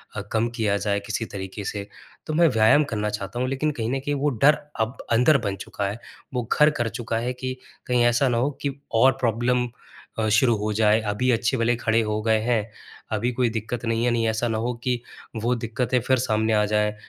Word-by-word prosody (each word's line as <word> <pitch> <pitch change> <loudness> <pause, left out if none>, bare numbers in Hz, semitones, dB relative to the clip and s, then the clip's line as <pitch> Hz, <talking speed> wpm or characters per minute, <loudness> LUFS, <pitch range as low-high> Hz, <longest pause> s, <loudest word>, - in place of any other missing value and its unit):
अ, - - -3
कम 115 +1 +1
किया 105 -2 +1
जाए 100 -1 0
किसी 110 +1 -2
तरीके 95 +1 -6
से। 100 -1 -4 0.4
तो 155 - -2
मैं 170 +1 +5
व्यायाम 110 +6 +5
करना 105 -1 -1
चाहता 105 +3 -5
हूँ, 130 - 0
लेकिन 150 +3 0
कहीं 115 -4 -3
न 135 - 0
कहीं 145 +2 -2
वो 145 +1 +1
डर 150 +1 +7 0.2
अब 110 +4 -2
अंदर 125 +6 +5
बन 100 - -2
चुका 100 - -4
है, 105 +4 -5 0.3
वो 125 -1 -1
घर 150 +1 +5
कर 115 - 0
चुका 115 0 -3
है 125 +2 -2
कि 130 +1 -5 0.3
कहीं 125 -1 +3
ऐसा 120 +3 +3
ना 120 - +1
हो 135 +5 +1
कि 140 -2 -2 0.3
और 130 - +7
प्रॉब्लम 120 +1 +1 0.5
अ, 110 - +1
शुरू 115 +2 +4
हो 105 +1 -2
जाए। 110 +1 +3
अभी 110 +4 -1
अच्छे-भले 115 +1 +1
खड़े 115 -1 +2
हो 105 0 -2
गए 110 -1 +3
हैं, 110 -2 0 0.4
अभी 110 +3 0
कोई 125 -1 +1
दिक्कत 115 +1 -4
नहीं 115 0 0
है, 120 - +2
नहीं, 115 -1 +1
ऐसा 110 +2 0
ना 110 -1 -1
हो 120 +2 -1
कि 125 -2 0 0.4
वो 120 - +2
दिक्कतें 120 +2 -1
फिर 130 +2 +2
सामने 110 -2 +1
आ 105 -1 +3
जाएँ, 105 0 +1
115 Hz, 220 wpm, -24 LUFS, 110-125 Hz, 0.5 s, डर